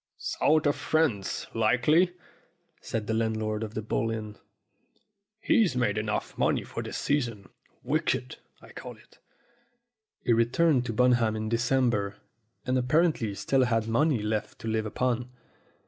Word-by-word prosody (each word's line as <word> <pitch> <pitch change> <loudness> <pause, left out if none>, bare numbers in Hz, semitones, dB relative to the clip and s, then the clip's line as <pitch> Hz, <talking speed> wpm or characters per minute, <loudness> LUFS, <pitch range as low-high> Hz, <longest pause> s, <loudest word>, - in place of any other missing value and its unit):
"South 155 +1 +1
of 145 - +3
France, 140 -12 0
likely," 125 +11 +3 0.7
said 110 -2 -3
the 110 - -2
landlord 110 -1 -1
of 110 -1 -5
the 110 - -3
Bull 115 +1 -1
Inn. 110 -2 -5 1.0
"He's 210 - +2
made 125 -1 +1
enough 110 0 -2
money - - +2
for - - -7
it - - -4
this - - -5
season. 120 -9 -1 0.3
Wicked, 65 - -1 0.3
I - - -14
call - - -9
it." - - -23 1.1
He 120 - +4
returned 125 +3 +2
to 115 - -2
Bunham 120 -2 +3
in 110 0 -3
December, 120 -4 +1 0.5
and 130 0 +1
appar 155 +7 +3
ently 105 -7 -4
still 135 -1 +2
had 115 -2 0
money 125 0 +2
left 105 0 -2
to - - -6
live 110 0 -1
upon. 125 +2 -1
115 Hz, 145 wpm, -28 LUFS, 110-130 Hz, 1.1 s, He